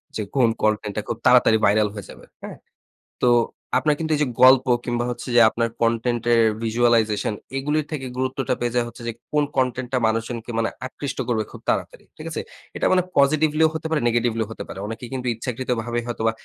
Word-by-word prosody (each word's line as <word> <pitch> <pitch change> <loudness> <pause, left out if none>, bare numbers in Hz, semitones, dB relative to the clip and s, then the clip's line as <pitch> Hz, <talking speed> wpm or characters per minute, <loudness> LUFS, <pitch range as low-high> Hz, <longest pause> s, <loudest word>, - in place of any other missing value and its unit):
যে 110 - -2
কোন 125 -4 +4
content 105 -1 0
টা, 105 - -1
খুব 115 - -3
তাড়াতাড়ি 120 -3 +6
viral 105 +1 +3
হয়ে 105 -2 -8
যাবে। - - -13 0.2
হ্যাঁ? - - -8 0.7
তো - - +5 0.5
আপনার 145 +3 +2
কিন্তু 160 -1 -2
এইযে 150 -1 +1 0.2
গল্প 130 0 +7 0.2
কিংবা 120 -1 -1
হচ্ছে 120 - -7
যে 120 - +7
আপনার 115 +1 -1
content 115 0 +1
এর 115 - +5 0.3
visualization 110 -2 +2 0.2
এগুলোর 150 +2 0
থেকে 145 -4 -4
গুরুত্বটা 130 0 -1
পেয়ে 120 0 -1
যায় 120 -1 +2
হচ্ছে 120 - -11
যে, 115 - -2 0.2
কোন 150 0 +3
content 130 -1 0
টা - - +3
মানুষজনকে 115 +1 -3
মানে 115 - +1 0.2
আকৃষ্ট 140 +1 -6
করবে 115 -3 0
খুব - - -11
তাড়াতাড়ি। - - -2
ঠিক - - -9
আছে? - - -3 0.3
এটা - - -1
মানে 185 -1 +4
positively 155 +2 +3
ও - - -2
হতে 160 0 -3
পারে, 160 -1 +1
negetively 115 -1 +1
ও - - -15
হতে - - -6
পারে। - - -8
অনেকে 115 +2 -6
কিন্তু 125 -1 -4
ইচ্ছাকৃতভাবে 120 0 -3
হয়তোবা 115 -2 0
120 Hz, 195 wpm, -22 LUFS, 115-130 Hz, 0.7 s, গল্প